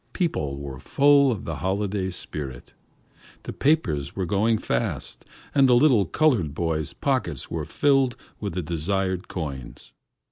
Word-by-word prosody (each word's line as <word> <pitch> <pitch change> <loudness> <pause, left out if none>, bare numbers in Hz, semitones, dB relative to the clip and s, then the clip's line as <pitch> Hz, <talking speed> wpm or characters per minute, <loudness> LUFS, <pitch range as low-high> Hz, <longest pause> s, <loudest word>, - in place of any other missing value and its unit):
People 75 - -1
were 70 -2 -7
full 140 - +4
of 110 - -4
the 80 -3 -4
holiday 95 +3 -1
spirit. 70 -7 -7 0.7
The - - -6
papers 80 - +1
were 95 - -1
going 105 +5 +2
fast, - - -3 0.3
and 135 -2 +5
the 125 - +6
little 120 -6 +5
colored 110 - +2
boy's 80 -3 -1
pockets - - -2
were 80 -3 -2
filling 135 - +2 0.3
with 100 -5 -4
the 90 - -2
desired 90 +3 -1
coins. 65 -8 -7
95 Hz, 140 wpm, -25 LUFS, 75-125 Hz, 0.7 s, the